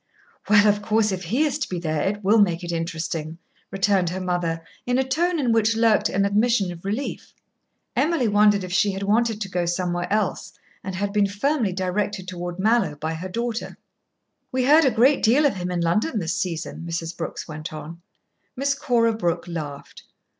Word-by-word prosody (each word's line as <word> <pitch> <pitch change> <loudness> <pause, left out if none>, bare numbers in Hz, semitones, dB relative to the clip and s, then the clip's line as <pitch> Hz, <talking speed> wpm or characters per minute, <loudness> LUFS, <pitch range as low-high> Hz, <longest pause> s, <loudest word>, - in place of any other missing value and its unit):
"Well, 205 0 +6
of 205 0 +2
course 215 0 +1
if 185 -1 -4
he 240 - +1
is 295 -1 -1
to - - -3
be 180 - -3
there, 155 -3 -2
it 205 +4 -2
will 210 +4 +4
make 180 -4 +2
it 175 - -4
interesting," 165 -1 -3 0.3
returned 195 -2 +1
her 185 +2 -4
mother, 175 -3 -2 0.2
in 245 0 +2
a 265 - +3
tone 330 +6 0
in 250 -5 +1
which 225 0 +3
lurked 220 -2 +3
an 195 +1 +1
admission 205 -1 +2
of 170 -1 -10
relief. 220 +8 -4 0.6
Emily 310 -7 +2
wondered 205 -1 +4
if 180 -1 -6
she 200 +1 +2
had 195 +1 -4
wanted 220 +2 +1
to 205 - -3
go 180 -2 -2
somewhere 175 0 -2
else 210 -2 -1 0.3
and 190 -2 -5
had 200 +1 -2
been 205 -1 +3
firmly 225 +2 0
directed 190 +1 -2
toward 175 -1 -5
Mallowe 220 -4 +2
by 155 +2 -3
her 175 +4 -6
daughter. 235 +3 -4 0.7
"We 255 0 0
heard 305 +3 +6
a - - +5
great 250 +5 +3
deal 255 +7 +4
of 265 -9 +1
him 180 0 -3
in 175 -1 -1
London 210 - +1
this 170 -5 -1
season," 165 -2 -4
Mrs. 165 0 -4
Brooks 170 - -5
went 155 +1 -7
on. 155 +2 -8 0.5
Miss 275 +2 +1
Cora 235 -5 +1
Brooke 175 -5 -2
laughed. 150 -5 -7
200 Hz, 195 wpm, -23 LUFS, 175-225 Hz, 0.7 s, Well